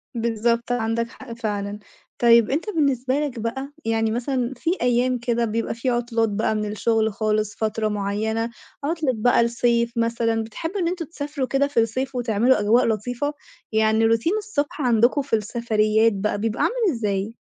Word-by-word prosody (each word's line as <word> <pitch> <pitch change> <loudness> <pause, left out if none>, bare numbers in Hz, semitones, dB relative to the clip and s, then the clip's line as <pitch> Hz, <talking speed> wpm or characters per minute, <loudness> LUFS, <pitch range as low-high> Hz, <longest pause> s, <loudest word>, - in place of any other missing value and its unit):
بالضبط، 235 +1 0
عندك 230 -1 0
حق 245 0 -10
فعلًا، 205 -3 -3 0.4
طيب 235 -2 +5
أنت 315 +10 -1
بالنسبة 275 - +1
لك 280 -6 -3
بقى، 265 +5 -4
يعني 225 -1 +1
مثلًا 250 +1 -1
في 330 +6 0
أيام 245 +1 +2
كده 235 -1 0
بيبقى 225 +1 -2
في 240 +3 -2
عُطلات 235 -2 0
بقى 215 +1 0
من 210 0 -1
الشُغل 220 0 +1
خالص، 215 -1 -1
فترة 220 0 -1
معيّنة، 215 +3 -1 0.3
عُطلة 310 -2 0
بقى 235 +2 +3
الصيف 235 0 +1
مثلًا، 230 -1 +1
بتحبوا 325 - -5
إن 345 - +1
أنتم 345 -1 -2
تسافروا 290 -3 -4
كده 275 +2 +2
في 285 - 0
الصيف 255 +4 -1
وتعملوا 240 +1 +2
أجواء 220 +4 +3
لطيفة؟ 245 +6 -1 0.4
يعني 220 0 +3
routine 230 - +2
الصبح 305 -9 -3
عندكم 245 +3 +3
في 270 -4 0
السفريات 220 0 +2
بقى 205 +1 -1
بيبقى 220 +1 -1
عامل 455 -7 +1
إزاي؟ 210 -1 -2
235 Hz, 160 wpm, -23 LUFS, 220-260 Hz, 0.4 s, طيب